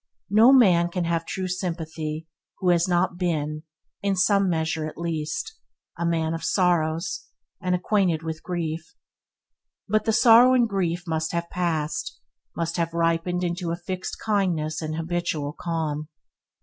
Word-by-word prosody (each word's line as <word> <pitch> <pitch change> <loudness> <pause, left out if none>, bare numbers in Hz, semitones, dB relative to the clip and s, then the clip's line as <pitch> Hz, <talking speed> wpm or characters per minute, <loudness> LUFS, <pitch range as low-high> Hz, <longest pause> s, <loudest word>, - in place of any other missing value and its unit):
No 220 +5 +7
man 180 -10 +5
can 180 0 -2
have 165 0 -1
true 185 -1 -3
sympathy 165 -3 -4 0.3
who 185 - 0
has 175 0 +3
not 175 0 +1
been, 155 -4 -1 0.4
in 200 -1 +1
some 195 +1 +3
measure 160 -1 -1
at 155 - -9
least, 170 - -3 0.4
"a 170 +1 -1
man 165 -1 0
of 165 - -4
sorrows, 170 0 0 0.3
and 180 -1 +1
acquainted 180 -4 +1
with 160 -1 -5
grief," 165 -2 -4 0.9
but 215 +1 +1
the 225 - +3
sorrow 240 +3 +7
and 240 -2 +4
grief 180 -4 -1
must 160 -1 -2
have 170 0 -2
passed, 170 +4 -2 0.4
must 165 0 -2
have 170 -1 -1
ripened 170 +2 +1
into 175 0 -2
a 165 - 0
fixed 180 +1 -5
kindness 180 -8 0
and 155 0 -3
habitual 165 -3 -2
calm. 155 -3 -3
170 Hz, 150 wpm, -25 LUFS, 160-185 Hz, 0.9 s, No